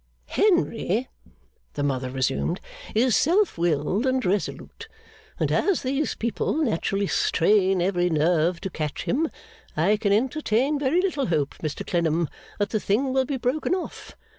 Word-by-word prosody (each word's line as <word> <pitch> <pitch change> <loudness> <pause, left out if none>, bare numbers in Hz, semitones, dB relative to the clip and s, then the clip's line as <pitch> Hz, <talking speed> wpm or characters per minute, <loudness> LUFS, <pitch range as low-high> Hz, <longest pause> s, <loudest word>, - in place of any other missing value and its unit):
'Henry,' 260 - +1 0.6
the 145 - -3
mother 130 -2 -1
resumed, 135 +7 -1 0.4
'is 240 +1 +3
self 370 +5 +3
willed 170 - 0
and 260 0 +1
resolute; 195 +2 -3 0.5
and - - 0
as 395 -6 +1
these 275 +3 -1
people 235 +4 -1
naturally 205 - 0
strain 190 +1 +2
every 180 -1 +1
nerve 165 +2 +2
to 190 - -4
catch 155 -3 -4
him, 310 +5 0 0.5
I 195 +7 +3
can 205 -1 0
entertain 265 +4 +1
very 290 +6 +2
little 300 -8 0
hope, 150 -5 0
Mr 155 -2 -4
Clennam, 170 -2 0 0.3
that 205 0 -1
the 215 - +1
thing 255 +7 0
will 265 0 +2
be 275 0 -2
broken 260 +8 0
off. 370 - -7
205 Hz, 145 wpm, -25 LUFS, 170-265 Hz, 0.6 s, is